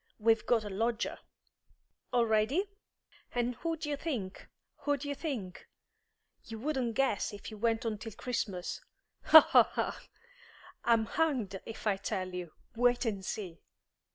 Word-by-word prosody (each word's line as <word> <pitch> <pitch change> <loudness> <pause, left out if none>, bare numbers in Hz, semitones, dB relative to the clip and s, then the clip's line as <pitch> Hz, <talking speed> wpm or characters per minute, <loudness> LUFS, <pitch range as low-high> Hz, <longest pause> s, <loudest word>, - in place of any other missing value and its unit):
We've 225 0 +2
got 230 -3 +3
a 205 - -5
lodger." 225 +4 -1 0.9
"Already?" 235 - +2 0.7
"And 245 0 +1
who 330 +2 -2
d'ye 295 -2 -2
think? 245 - -4 0.3
Who 290 -1 0
d'ye 285 +1 -4
think? 260 - -5 0.8
You 225 - -8
wouldn't 255 -2 -1
guess 270 -7 +1
if 205 +2 -8
you 215 - -8
went 230 +1 +1
on 215 -2 -2
till 220 0 -7
Christmas. 205 -6 -3 0.4
Ho, 315 - +11
ho, - - +6
ho! - - -1 0.9
I'm 230 -2 +3
hanged 235 - 0
if 225 - -8
I 205 -2 +2
tell 185 -1 -3
you. 180 -3 -5 0.2
Wait 245 +1 +3
and 200 -4 -2
see!" 185 -4 -5
230 Hz, 140 wpm, -32 LUFS, 205-260 Hz, 0.9 s, Ho